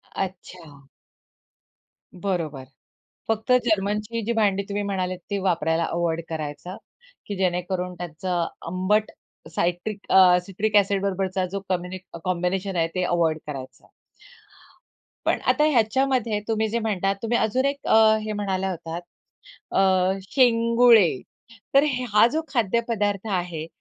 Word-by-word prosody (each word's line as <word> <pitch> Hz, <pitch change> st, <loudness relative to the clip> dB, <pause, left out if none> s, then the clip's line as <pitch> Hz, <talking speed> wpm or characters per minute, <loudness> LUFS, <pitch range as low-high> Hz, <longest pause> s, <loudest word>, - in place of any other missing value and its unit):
अच्छा. 175 Hz, -7 st, -7 dB, 1.3 s
बरोबर. 160 Hz, -9 st, -2 dB, 0.6 s
फक्त 225 Hz, +2 st, -1 dB
जर्मनची 210 Hz, +1 st, 0 dB
जी 235 Hz, -, 0 dB
भांडी 200 Hz, -3 st, +1 dB
तुम्ही 205 Hz, 0 st, -2 dB
म्हणाल 185 Hz, -2 st, -2 dB, 0.2 s
ती 200 Hz, -, -1 dB
वापरायला 170 Hz, -3 st, +1 dB
अव्हॉइड 170 Hz, 0 st, -1 dB
करायचं, 160 Hz, +4 st, -5 dB, 0.5 s
की 205 Hz, -, -4 dB
जेणेकरून 180 Hz, 0 st, -1 dB
त्याचं 175 Hz, 0 st, -3 dB, 0.2 s
आंबट 185 Hz, +5 st, +1 dB, 0.4 s
सायट्रिक 180 Hz, +4 st, -2 dB
अ 185 Hz, -2 st, +7 dB
सिट्रिक 210 Hz, +2 st, -2 dB
एसिड 200 Hz, -1 st, +3 dB
बरोबरचा 190 Hz, -1 st, -1 dB
जो 200 Hz, -, -2 dB
कॉम्बि 180 Hz, 0 st, -2 dB, 0.3 s
कॉम्बिनेशन 185 Hz, +2 st, -1 dB
आहे 165 Hz, -1 st, +2 dB
ते 185 Hz, -, 0 dB
अव्हॉइड 170 Hz, -3 st, +1 dB
करायचं. 135 Hz, -3 st, -8 dB, 1.4 s
पण -, -, +2 dB
आता 300 Hz, -, +3 dB
ह्याच्यामध्ये 240 Hz, -2 st, +1 dB
तुम्ही 220 Hz, 0 st, +1 dB
जे 235 Hz, -, -1 dB
म्हणतात 195 Hz, -3 st, 0 dB
तुम्ही 230 Hz, +1 st, +1 dB
अजून 255 Hz, +5 st, +1 dB
एक 280 Hz, 0 st, -3 dB
अ, 220 Hz, 0 st, +6 dB
हे 215 Hz, -, -3 dB
म्हणाला 190 Hz, -2 st, -2 dB
होतात, 165 Hz, -1 st, -5 dB, 0.7 s
अ, 190 Hz, 0 st, +3 dB
शेंगुळे. 230 Hz, -, +4 dB, 0.5 s
तर 275 Hz, +2 st, +6 dB, 0.3 s
हा 210 Hz, +2 st, +7 dB
जो 320 Hz, -, +1 dB
खाद्य 235 Hz, -3 st, +1 dB
पदार्थ 205 Hz, -2 st, -1 dB
आहे, 175 Hz, -3 st, -3 dB
195 Hz, 125 wpm, -24 LUFS, 175-215 Hz, 1.4 s, अ